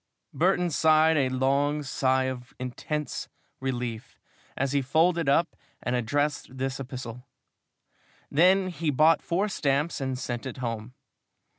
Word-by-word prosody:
Burton 180 0 +2
sighed 155 +2 +4
a 135 -4 +2
long 140 +3 +1
sigh 130 -1 +1
of 130 -1 -5
intense 140 +4 -4 0.3
relief 125 -4 -4 0.4
as 135 0 0
he 140 0 +2
folded 165 +3 +2
up 165 +4 +2 0.3
and 125 - 0
addressed 140 +2 -1
this 135 +1 -2
epistle. 125 -2 -7 1.0
Then 185 +5 +4
he 165 -2 -2
bought 155 +4 +4
four 190 +5 0
stamps 145 -4 0
and 130 -1 -2
sent 120 +1 -4
it 130 - -7
home. 115 -1 -4
135 Hz, 130 wpm, -27 LUFS, 130-155 Hz, 1.0 s, sighed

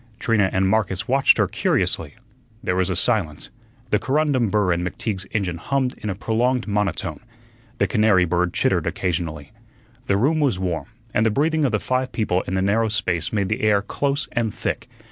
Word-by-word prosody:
Trina 105 -5 +2
and 95 0 +1
Marcus 100 -1 0
watched 135 +1 +4
her - - +3
curiously. - - -1 0.5
There 90 - 0
was 95 0 +1
a 95 - -1
silence. 90 -7 0 0.4
The 105 - +3
corundum 135 -5 +1
burr 105 -3 +2
in 85 +1 -2
McTeague's 95 +1 -3
engine 95 -6 -1
hummed 130 +5 -1
in 105 - -4
a 95 - -2
prolonged 120 +5 0
monotone. 100 -6 -1 0.6
The - - +2
canary 105 -5 +3
bird 90 +1 0
chittered - - +1
occasionally. 80 -4 -3 0.6
The 100 - +2
room 145 +9 +2
was 140 -10 +2
warm, 85 -6 -2 0.3
and 110 - +2
the 110 - +3
breathing 155 +6 +1
of 130 - +1
the 105 - +1
five 130 +2 -1
people 95 -5 0
in 95 - -2
the 95 - +1
narrow 110 +3 +2
space 90 -7 -1
made 100 -3 0
the - - -1
air 105 -2 +3
close 140 +6 -1
and 115 -2 0
thick. - - -4
105 Hz, 185 wpm, -22 LUFS, 90-120 Hz, 0.6 s, watched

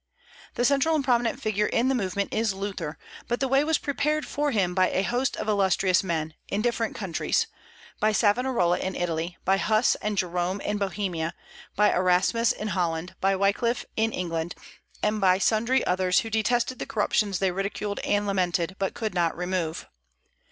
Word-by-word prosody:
The 245 - +1
central 280 +4 +3
and 300 - +1
prominent 240 -1 +1
figure 210 -4 0
in 240 +2 +1
the 270 - +2
movement 200 -4 -2
is 220 -3 0
Luther; 190 -6 -4 0.3
but 240 - -1
the 270 - +1
way 270 +2 +3
was 315 0 +2
prepared 300 +2 -1
for 295 0 -1
him 195 -8 +1
by 185 0 +3
a 190 - 0
host 245 +6 0
of - - -4
illustrious 190 -2 +3
men, 160 -4 -2
in 205 +2 -1
different 235 -2 -1
countries, 190 -5 0 0.5
by 215 - +3
Savonarola 210 -4 +2
in 190 0 -3
Italy, 170 0 -2
by 195 +1 +3
Huss 215 +4 +3
and 210 -1 -2
Jerome 180 +1 -1
in 210 0 -2
Bohemia, 185 -4 -2 0.4
by 210 +1 +4
Erasmus 185 +6 +3
in 215 - -4
Holland, 175 -2 -1
by 195 0 +3
Wyclif 200 +5 +1
in 225 0 +1
England, 170 -3 -3 0.5
and 210 0 +1
by 185 -1 +5
sundry 230 +6 +2
others, 180 0 +2
who 225 - -7
detested 240 +3 0
the - - -4
corruptions 205 -2 +1
they 190 0 +1
ridiculed 200 +2 -3
and 205 0 0
lamented, 185 -2 0
but 195 -1 -1
could 220 -2 -3
not 170 -3 0
remove. 180 -2 -2
200 Hz, 175 wpm, -26 LUFS, 180-230 Hz, 0.5 s, by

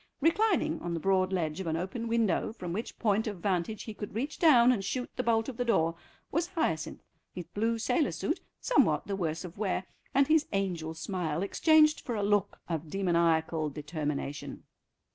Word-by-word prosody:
Reclining 330 0 +2
on 170 0 -3
the - - -2
broad 190 +1 +2
ledge 165 -4 -1
of 190 - -4
an 160 0 0
open 195 +7 -4
window, 225 -3 +1
from 180 -6 -6
which 220 +5 -5
point 220 0 +1
of 205 -3 -4
vantage 185 +3 -1
he 220 - -6
could 205 -1 -7
reach 275 +7 -3
down 255 -7 +7
and 215 -6 0
shoot 250 +5 -3
the - - 0
bolt 225 -2 +1
of 260 -4 -6
the 250 - 0
door, 165 -9 +2 0.4
was 335 +3 0
Hyacinth, 315 - -2 0.3
his 180 - -5
blue 225 +2 -1
sailor 295 +8 +1
suit - - -2 0.2
somewhat - - +2
the 200 - -2
worse 170 -2 -2
of 180 +2 -10
wear, 190 -3 -1 0.3
and 275 +1 +4
his 310 0 +3
angel 175 -5 -2
smile 165 -1 -2
exchanged 310 +8 +4
for 240 - -4
a 205 - -1
look 205 -1 +1
of 165 -2 -3
demoniacal 165 -4 +1
determination. 150 -1 -4
195 Hz, 185 wpm, -30 LUFS, 170-235 Hz, 0.4 s, down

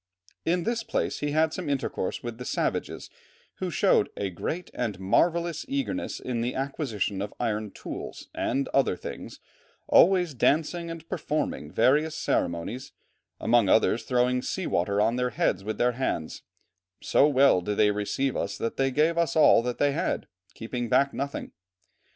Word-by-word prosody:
In 175 +1 +1
this 230 +2 -1
place 225 0 -2
he 145 - -1
had 155 +1 +2
some 175 -4 -4
intercourse 135 -8 -2
with 120 -1 -6
the - - -5
savages, - - -2 0.5
who - - -3
showed - - +3
"a 100 -2 -2
great 165 - -4
and 110 -6 -3
marvellous 170 - +1
eagerness 275 0 -2
in 120 -2 -3
the 120 +2 -2
acquisition 130 - -2
of 100 - -5
iron 110 -3 -1
tools - - -8
and 135 +3 -1
other 135 -8 +2
things, - - -8 0.5
always 180 -3 +5
dancing 160 +6 +1
and 165 -1 -8
performing 150 - -3
various 145 - +3
ceremonies, 85 +10 -2 0.5
among 115 -4 +3
others 110 +2 +3
throwing 125 0 +1
sea 185 +7 -3
water 100 +4 0
on 115 +3 +2
their 125 0 +1
heads 95 -4 0
with 110 +2 -4
their 120 0 +3
hands; 115 -10 -3 0.6
so 145 - +4
well 140 -9 +4
did 105 +3 -3
they 105 -1 +4
receive 115 +6 -1
us 100 - -2
that 115 - -3
they 135 0 +2
gave 155 +5 +2
us 170 0 +1
all 155 -6 +6
that 125 0 -3
they 145 0 +2
had, - - -1 0.3
keeping 120 +1 -4
back 140 +2 +3
nothing." 140 +1 -4
130 Hz, 160 wpm, -27 LUFS, 110-155 Hz, 0.6 s, all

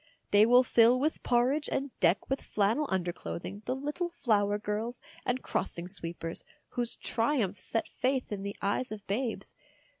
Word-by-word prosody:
They 205 +2 +7
will 245 +2 +7
fill 240 0 +5
with 305 +4 0
porridge 255 +5 +2
and 275 0 -1
deck 175 +2 +3
with 270 - -1
flannel 220 +9 +1
underclothing 175 - -3
the 255 - 0
little 295 +6 -2
flower 210 -11 +1
girls 215 +4 -3 0.3
and 250 +1 0
crossing 170 +1 -2
sweepers, 170 -3 -5 0.3
whose 240 -1 -2
triumphs 225 -6 0
set 225 - -1
faith 260 -1 -1
in 200 -2 -3
the 200 0 -5
eyes 205 +4 0
of 210 -2 -7
babes. 230 +4 -2
225 Hz, 155 wpm, -30 LUFS, 200-255 Hz, 0.3 s, They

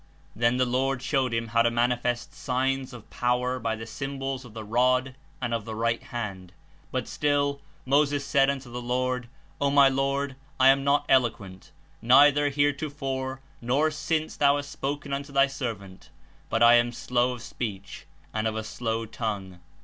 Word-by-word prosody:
Then 120 +3 +2
the 125 - +3
Lord 130 +1 0
showed 130 -2 +1
him 115 0 -2
how 115 0 +3
to 120 - +4
manifest 120 0 0
signs 130 0 -1
of 120 -4 -11
pow 125 0 +1
•er 125 0 -2
by 115 -1 -1
the 110 0 -7
symbols 135 +1 -4
of 120 -3 -14
the 110 - -6
rod 125 +4 +2 0.3
and 120 -2 -2
of 115 -2 -1
the 110 +1 -6
right 115 +1 0
hand, 95 -6 -6 0.4
but - - -2
still 145 -1 0 0.3
^'Moses 145 +1 +3
said 135 -1 +3
unto 135 -3 -4
the 125 +1 -5
LoRD^ 125 +1 -1 0.4
O 140 - +3
my 140 -1 +6
Lord, 135 0 -1 0.2
I 130 0 +7
am 135 0 +4
not 145 +1 +2
eloquent, 100 -7 0 0.3
neither 145 +4 +6
heretofore 135 -2 -2 0.2
nor 140 +6 +1
since 155 +1 -2
thou 140 -1 +4
hast 145 0 -4
spoken 140 0 -4
unto 140 +1 -4
thy 140 0 +5
servant, 115 -9 -6 0.4
but 115 - +2
I 120 0 +8
am 120 0 +2
slow 125 +1 0
of 120 -2 -9
speech, 105 -7 -6 0.3
and 110 0 0
of 110 - -2
a 110 - -3
slow 115 +1 -3
tongue." 100 -5 -5
125 Hz, 175 wpm, -26 LUFS, 115-140 Hz, 0.4 s, I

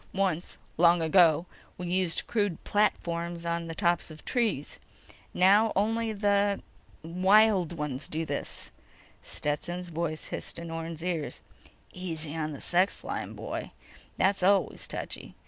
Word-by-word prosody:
Once—long 175 -2 +1
ago—we 170 +1 +2
used 180 -1 0
crude 205 -7 -1
platforms 170 -4 0
on 170 0 -1
the 165 - -5
tops 175 -2 +1
of 155 - -10
the - - -15
trees. 225 - -1 0.5
Now... 205 +4 +5
only 225 +3 +1
the... 200 -1 +1 0.4
wild 185 +1 +4
ones 150 -4 -3
do 160 +1 -3
this." 145 -2 -5 0.5
Stetson's 175 +4 -3
voice 160 -1 -3
hissed - - -4
in 170 0 -6
Orne's 165 0 -5
ears: 170 -5 -3 0.5
_"Easy 165 -4 -5
on 155 -1 -2
the 140 - -8
sex 185 +3 +1
line, - - -4
boy. - - -5 0.4
That's 195 +1 +2
always 195 +2 +2
touchy. - - -6
175 Hz, 130 wpm, -29 LUFS, 165-195 Hz, 0.5 s, Now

